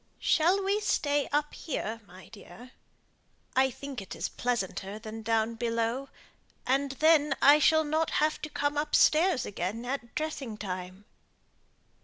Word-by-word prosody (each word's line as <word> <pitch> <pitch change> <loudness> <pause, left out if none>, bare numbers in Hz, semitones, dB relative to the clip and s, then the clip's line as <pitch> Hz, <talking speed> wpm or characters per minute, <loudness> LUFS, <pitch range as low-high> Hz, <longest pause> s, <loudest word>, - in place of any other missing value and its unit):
"Shall 360 +5 +2
we 400 +2 +1
stay 290 -8 0
up 295 0 0
here, 230 -7 -4
my 185 +1 -14
dear? 225 +3 -13 0.8
I 265 +1 +4
think 270 -1 -7
it 195 - -8
is - - -3
pleasanter 205 -4 -3
than 220 0 -8
down 225 0 0
below; 230 +3 -2 0.6
and 270 +1 +1
then 300 -1 +4
I 290 +2 +7
shall 315 +1 +4
not 315 +1 0
have 310 +1 +1
to 305 - -5
come 290 0 -1
upstairs 305 0 +3
again 205 +5 -4
at 245 -2 -5
dressing 280 -8 -4
time." 185 -1 -6
265 Hz, 140 wpm, -29 LUFS, 225-300 Hz, 0.8 s, I